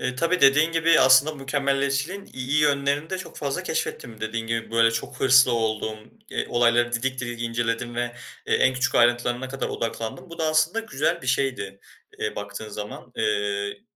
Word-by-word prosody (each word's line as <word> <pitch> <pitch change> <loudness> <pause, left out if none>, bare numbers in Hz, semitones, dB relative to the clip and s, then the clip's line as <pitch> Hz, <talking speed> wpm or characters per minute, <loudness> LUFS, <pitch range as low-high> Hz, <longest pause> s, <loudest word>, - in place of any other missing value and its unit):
Eee, 125 0 -2
tabii 165 +7 0
dediğin 145 +4 +5
gibi 165 0 +4
aslında 130 +4 +6
mükemmelliyetçiliğin 140 +5 -1
iyi 130 +3 -1
yönlerini 145 +1 +1
de 190 - -2
çok 185 - -9
fazla 145 +5 -3
keşfettim. 115 -10 -4
Dediğin 115 +1 -3
gibi, 115 0 -3
böyle, 115 0 +4
çok 115 0 -5
hırslı 130 -1 +6
oldum, 110 -1 -1 0.3
eee, - - -2
olayları 120 0 +2
didik 130 +2 -1
didik 120 -1 -5
inceledim 115 0 -2
ve 120 0 -2 0.3
e - - +2
en 130 - +3
küçük 130 0 -1
ayrıntılarına 120 +1 +2
kadar 135 +1 -4
odaklandım. 115 +7 -5
Bu 170 - -10
da 160 - 0
aslında 155 +7 +2
güzel 195 -6 -1
bir - - -8
şeydi, 125 -7 -1 0.4
eee, - - -3
baktığın 105 +1 -6
zaman. 105 +4 -8
Eee, 105 - -1
130 Hz, 170 wpm, -24 LUFS, 115-145 Hz, 0.4 s, aslında